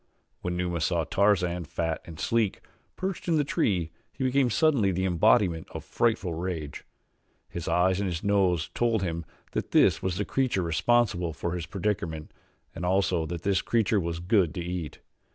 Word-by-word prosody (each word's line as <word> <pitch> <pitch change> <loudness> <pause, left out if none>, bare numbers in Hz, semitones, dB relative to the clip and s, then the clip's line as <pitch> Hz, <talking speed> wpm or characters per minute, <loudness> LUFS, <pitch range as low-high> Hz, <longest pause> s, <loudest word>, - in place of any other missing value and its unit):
When 90 0 -2
Numa 90 -2 -1
saw 85 0 +1
Tarzan, 90 -2 +1
fat 80 +2 -2
and 80 -2 -10
sleek, 115 -4 0 0.3
perched 185 -1 -4
in 165 -2 +3
the 150 - +3
tree 90 - 0 0.2
he - - -5
became 130 0 +2
suddenly 130 -6 +3
the 95 +1 -1
embodiment 85 -1 +3
of - - -5
frightful 110 -7 0
rage. 80 -4 -4 0.6
His 85 -1 -6
eyes 90 +1 +2
and 100 -2 0
his 85 +1 -4
nose 95 -5 +2
told 115 -4 +1
him 85 -2 -3 0.3
that - - -3
this - - +4
was 90 -2 -2
the 105 - -1
creature 130 -8 0
responsible 90 0 +1
for 85 +4 -3
his 85 -1 -4
predicament 90 -6 -3 0.4
and 85 - -7
also 90 -3 +1
that 85 +1 -5
this 100 -1 +2
creature 110 -2 +1
was 85 -2 -3
good 90 -3 +1
to 90 - -3
eat. 85 -4 -5
90 Hz, 170 wpm, -27 LUFS, 85-105 Hz, 0.6 s, this